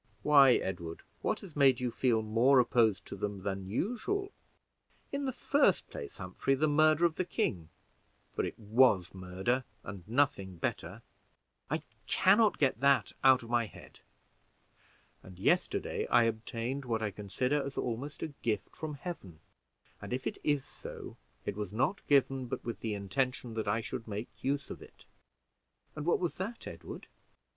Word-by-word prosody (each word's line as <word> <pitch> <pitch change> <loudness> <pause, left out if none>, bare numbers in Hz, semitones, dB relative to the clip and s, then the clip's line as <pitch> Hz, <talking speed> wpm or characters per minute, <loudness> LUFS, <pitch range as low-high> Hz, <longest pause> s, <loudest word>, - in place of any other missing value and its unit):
"Why, 140 -3 +7
Edward, 85 -6 -3 0.2
what - - -1
has 180 -6 -11
made 135 -4 +5
you 125 -1 -1
feel 115 -3 +2
more 115 +6 +4
opposed 115 -4 +3
to - - -7
them 100 -2 -4
than 95 -1 -3
usual?" 250 - -1 0.8
"In 280 0 -2
the 265 - 0
first 285 +3 +2
place, 445 -5 -7
Humphrey, 135 - -1
the 155 +3 +2
murder 155 +2 +4
of 165 -2 +1
the - - +1
king 85 - -2 0.6
for - - -1
it - - -4
was 110 -4 +3
murder 95 +7 -1 0.2
and 95 -2 -8
nothing 110 -7 +1
better 80 - -4 0.7
I - - -1 0.2
can 195 +4 +5
not 220 -3 +4
get 135 -5 +2
that 140 +1 +3
out 130 -2 +6
of 115 - -9
my 120 -2 +2
head; - - -14 1.2
and 95 -1 -13
yesterday 95 - +1
I 120 -1 +5
obtained 115 +4 -2
what 115 -3 -1
I 105 - -1
consider 125 +8 -1
as 140 0 -6
almost 125 +5 -3
a 160 - -2
gift 110 -3 -2
from 155 -2 -5
Heaven, 130 - -7 0.6
and - - -5
if 130 +1 -3
it - - -3
is 145 -2 +1
so - - -9 0.3
it - - -2
was 105 -2 -4
not 130 - 0
given 135 -2 +3
but - - -5
with 115 - -4
the 110 -2 -2
intention 125 +4 -2
that 110 -2 -3
I 110 +3 +1
should 115 - -6
make 105 +2 -4
use 140 +1 -1
of - - -8
it." - - -15 0.9
"And 150 +1 -5
what 175 - +4
was 175 -2 -2
that, 220 +5 -4
Edward?" - - -8
125 Hz, 170 wpm, -32 LUFS, 105-145 Hz, 1.2 s, Why